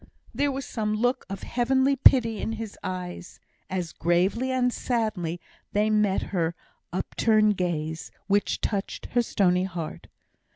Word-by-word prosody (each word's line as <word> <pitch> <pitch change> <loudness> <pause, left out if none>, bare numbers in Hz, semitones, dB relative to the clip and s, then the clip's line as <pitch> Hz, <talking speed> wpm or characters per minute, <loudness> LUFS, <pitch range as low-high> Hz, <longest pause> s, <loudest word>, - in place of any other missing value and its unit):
There 280 +4 +1
was 270 0 -4
some 215 -2 -2
look 245 +4 0
of 195 - -6
heavenly 265 +3 +2
pity 235 -4 +5
in 225 - -2
his 225 -2 -6
eyes, 180 -1 -6 0.3
as 180 -3 -3
gravely 185 - +1
and 250 -1 +1
sadly 200 -9 -1 0.3
they 210 +1 +2
met 210 -2 +2
her 170 -2 0 0.4
upturned 215 +3 +2
gaze, 160 -3 -2 0.2
which 205 0 +1
touched 200 -2 -3
her 245 - +3
stony 185 -5 +2
heart. 170 -4 -6
210 Hz, 135 wpm, -26 LUFS, 180-235 Hz, 0.4 s, pity